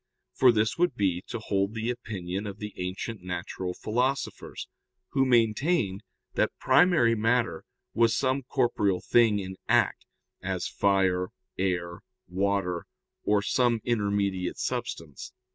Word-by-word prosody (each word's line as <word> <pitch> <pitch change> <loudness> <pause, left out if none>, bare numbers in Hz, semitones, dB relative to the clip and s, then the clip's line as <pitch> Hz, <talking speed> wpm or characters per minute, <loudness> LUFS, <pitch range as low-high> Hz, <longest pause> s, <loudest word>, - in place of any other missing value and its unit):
For 130 -2 +6
this 110 +4 0
would 175 -7 +2
be 95 -5 0
to - - -4
hold 100 -1 -1
the 115 +2 -1
opinion 100 -4 -5
of 100 -1 -6
the 105 0 -6
ancient 95 +4 -4
natural 90 0 -4
philosophers, 125 +5 -2 0.4
who 135 - +2
maintained 115 - +2 0.3
that - - 0
primary 140 -3 +4
matter 115 -5 +1 0.3
was 115 0 +3
some 130 0 +1
corporeal 120 -8 +1
thing 110 +3 +4
in 95 -1 -5
act, - - +2 0.3
as - - -2
fire, 95 -2 +2 0.3
air, 85 -2 -1 0.3
water, 95 -1 -1 0.3
or 105 -1 +2
some 120 -1 +2
intermediate 100 -5 0
substance. 80 -4 -4
105 Hz, 125 wpm, -28 LUFS, 95-120 Hz, 0.4 s, For